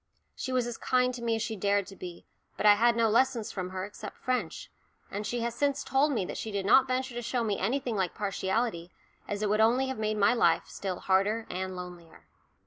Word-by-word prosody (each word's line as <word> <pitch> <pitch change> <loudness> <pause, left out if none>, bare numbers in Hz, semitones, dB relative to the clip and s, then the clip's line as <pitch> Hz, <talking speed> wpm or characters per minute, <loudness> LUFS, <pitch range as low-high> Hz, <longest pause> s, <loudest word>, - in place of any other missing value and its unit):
She 260 - -4
was 255 -2 +1
as 240 -1 -5
kind 250 0 +2
to 245 - -7
me 230 -1 +1
as 225 - -2
she 225 - -3
dared 200 0 +1
to 195 - -11
be, 180 -2 -9 0.3
but - - -2
I 210 - +9
had 235 +3 +3
no 230 -1 +3
lessons 230 0 +2
from 185 -2 -4
her 185 0 -4
except 205 - -9
French, 250 -10 -3 0.4
and 205 +1 -3
she 240 +2 -2
has 235 0 -1
since 280 +3 0
told 280 +3 +2
me 225 -9 0
that - - -5
she 220 - -4
did 200 -1 -2
not 265 +6 +6
venture 255 0 -1
to 240 - -4
show 240 +1 -1
me 210 -3 -1
anything 245 +3 -1
like 190 -3 -1
partiality, 195 -2 -1 0.4
as 205 +1 -3
it 210 - +1
would 215 +1 +3
only 250 +4 +3
have 265 - -4
made 215 0 -1
my 200 +2 +4
life 240 - +3
still 190 -3 -5
harder 205 +4 +2
and 185 +1 -3
lonelier. 180 -2 -10
220 Hz, 230 wpm, -29 LUFS, 195-245 Hz, 0.4 s, I